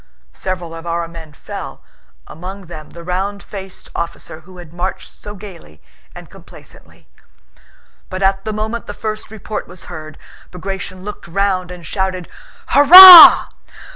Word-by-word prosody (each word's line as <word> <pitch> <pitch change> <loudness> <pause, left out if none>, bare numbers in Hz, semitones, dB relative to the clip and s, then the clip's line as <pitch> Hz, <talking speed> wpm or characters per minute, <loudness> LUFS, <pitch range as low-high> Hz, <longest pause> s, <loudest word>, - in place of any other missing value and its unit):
Several 180 -3 -7
of 165 +1 -11
our 170 0 -4
men 165 -2 -13
fell, 140 - -11 0.4
among 190 +4 -11
them 155 -3 -12
the 170 - -13
round 190 +3 -5
faced 195 -2 -11
officer 170 -1 -8
who 180 +3 -18
had 170 -2 -14
marched 180 +2 -7
so 205 0 -13
gaily 180 - -14 0.4
and - - -13
complacently. - - -19 1.0
But 185 +1 -6
at 195 0 -1
the 215 - -5
moment 220 +2 -6
the - - -9
first 215 -2 -7
report 215 0 -8
was 180 +1 -14
heard, 155 -2 -11 0.3
Bagratión 185 +1 -8
looked 210 -2 -10
round 185 0 -3
and 180 -2 -12
shouted, 185 +1 -5 0.4
"Hurrah!" 355 +5 +9
185 Hz, 140 wpm, -15 LUFS, 170-200 Hz, 1.0 s, Hurrah